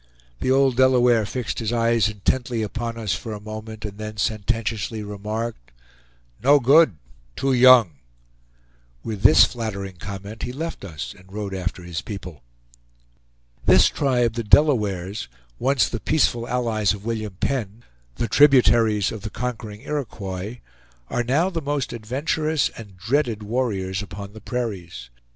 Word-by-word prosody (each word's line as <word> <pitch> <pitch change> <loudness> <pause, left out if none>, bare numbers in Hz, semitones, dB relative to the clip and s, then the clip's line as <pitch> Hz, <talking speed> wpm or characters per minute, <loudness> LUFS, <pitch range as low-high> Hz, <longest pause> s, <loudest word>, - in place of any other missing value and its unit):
The - - -1
old 135 -2 +3
Delaware 125 -4 +4
fixed 125 -1 -3
his 115 -2 -2
eyes 115 -2 +2
intently 115 +3 -1
upon 115 +2 -4
us 110 -4 -1
for 115 - -5
a 105 - -6
moment, 110 0 -8
and 105 0 -8
then 110 0 -6
sententiously 110 +1 -2
remarked: 105 - -5 0.7
"No 145 +4 +6
good! 135 - +5 0.4
Too 135 - 0
young!" 120 - +6 1.1
With 105 -3 -5
this 155 - +8
flattering 100 -6 -5
comment 100 +3 -8
he 125 - -3
left 160 +1 -5
us, 75 -10 -6
and 95 +1 -19
rode 100 -1 -5
after 90 -1 -4
his 85 -2 -4
people. 90 - -8 1.3
This - - +6
tribe, 125 -5 +1
the 115 0 -3
Delawares, 105 - +2 0.3
once 135 +1 +2
the 120 - -4
peaceful 120 -6 +1
allies 115 -5 +1
of 100 0 -9
William 110 -4 -3
Penn, 115 -4 -2 0.3
the 115 - -2
tributaries 115 -6 +4
of 110 - -7
the 105 - -5
conquering 110 -2 -5
Iroquois, 110 -7 -5 0.5
are 120 - 0
now 150 +10 +1
the 165 -2 -3
most 145 -4 -2
adventurous 145 +7 -1
and 100 -5 -12
dreaded 115 +1 0
warriors 100 -5 -1
upon 100 0 -8
the 110 - -11
prairies. 90 - -5
110 Hz, 140 wpm, -23 LUFS, 100-125 Hz, 1.3 s, this